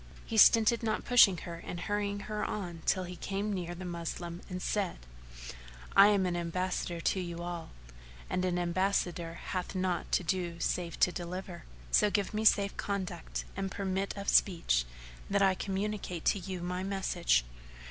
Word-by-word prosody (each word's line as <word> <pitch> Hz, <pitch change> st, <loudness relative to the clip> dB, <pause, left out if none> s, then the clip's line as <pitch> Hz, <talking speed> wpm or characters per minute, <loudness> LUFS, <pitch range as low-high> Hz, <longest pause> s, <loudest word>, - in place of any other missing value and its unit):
He 225 Hz, -, -5 dB
stinted 225 Hz, +1 st, +6 dB
not 220 Hz, -2 st, -1 dB
pushing 230 Hz, -7 st, +7 dB
her 170 Hz, -2 st, -6 dB
and 175 Hz, -, -6 dB
hurrying 205 Hz, +1 st, -2 dB
her 210 Hz, 0 st, -3 dB
on 175 Hz, -5 st, -4 dB
till 185 Hz, -, +2 dB
he 180 Hz, 0 st, -7 dB
came 200 Hz, +3 st, -3 dB
near 175 Hz, -2 st, -4 dB
the 185 Hz, +1 st, -7 dB
Moslem 170 Hz, 0 st, -5 dB
and 180 Hz, -1 st, -4 dB
said, 195 Hz, -1 st, -1 dB, 1.0 s
"I 195 Hz, +1 st, +9 dB
am 200 Hz, -2 st, +3 dB
an 180 Hz, -1 st, 0 dB
ambassador 175 Hz, 0 st, -2 dB
to 190 Hz, -, +1 dB
you 170 Hz, -1 st, -5 dB
all, 175 Hz, -1 st, -5 dB, 0.6 s
and 180 Hz, -, -1 dB
an 180 Hz, -1 st, 0 dB
ambassador 175 Hz, -1 st, 0 dB
hath 185 Hz, +2 st, -4 dB
naught 185 Hz, -2 st, -1 dB
to -, -, +3 dB
do 170 Hz, 0 st, -2 dB
save 170 Hz, -1 st, -2 dB
to 180 Hz, -, +5 dB
deliver; 180 Hz, +1 st, -6 dB, 0.3 s
so 210 Hz, -, +5 dB
give 205 Hz, 0 st, -1 dB
me 215 Hz, +1 st, -1 dB
safe 200 Hz, -2 st, +4 dB
conduct 190 Hz, -4 st, -4 dB
and 195 Hz, 0 st, -2 dB
permit 195 Hz, 0 st, -2 dB
of 200 Hz, 0 st, -6 dB
speech, 165 Hz, -, +3 dB, 0.4 s
that 200 Hz, 0 st, +3 dB
I 190 Hz, -1 st, +5 dB
communicate 195 Hz, -2 st, -3 dB
to 200 Hz, -, +3 dB
you 185 Hz, -1 st, -5 dB
my 180 Hz, +1 st, -2 dB
message." 185 Hz, -, +1 dB
185 Hz, 170 wpm, -31 LUFS, 175-200 Hz, 1.0 s, I